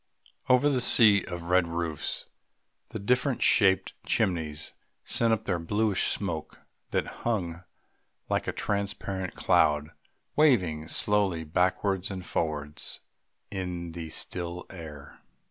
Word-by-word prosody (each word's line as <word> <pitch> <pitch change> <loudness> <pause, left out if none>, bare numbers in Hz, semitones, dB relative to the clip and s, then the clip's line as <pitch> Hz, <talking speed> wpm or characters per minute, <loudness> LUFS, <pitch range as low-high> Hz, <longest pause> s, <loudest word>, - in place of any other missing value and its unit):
Over 125 +3 +5
the 135 -4 +2
sea 105 -5 +7
of 85 -1 -5
red 90 -1 +4
roofs 85 -2 -2 0.6
the - - -5
different 125 +5 +1
shaped 95 -3 +4
chimneys 80 -4 -1 0.3
sent 115 -1 +1
up 110 -1 0
their 90 -3 0
bluish 105 +4 +1
smoke 85 -6 -3 0.3
that - - 0 0.2
hung 90 -7 -2 0.6
like - - -1
a - - +1
transparent 100 -2 -3
cloud 75 0 +2 0.4
waving 90 - +3
slowly 100 -5 +1
backwards 90 +4 0
and 95 -2 -6
forwards 75 -3 -3 0.5
in 90 -3 -4
the 80 -1 -7
still 85 +2 -2
air. 75 -5 -10
90 Hz, 115 wpm, -28 LUFS, 80-105 Hz, 0.6 s, sea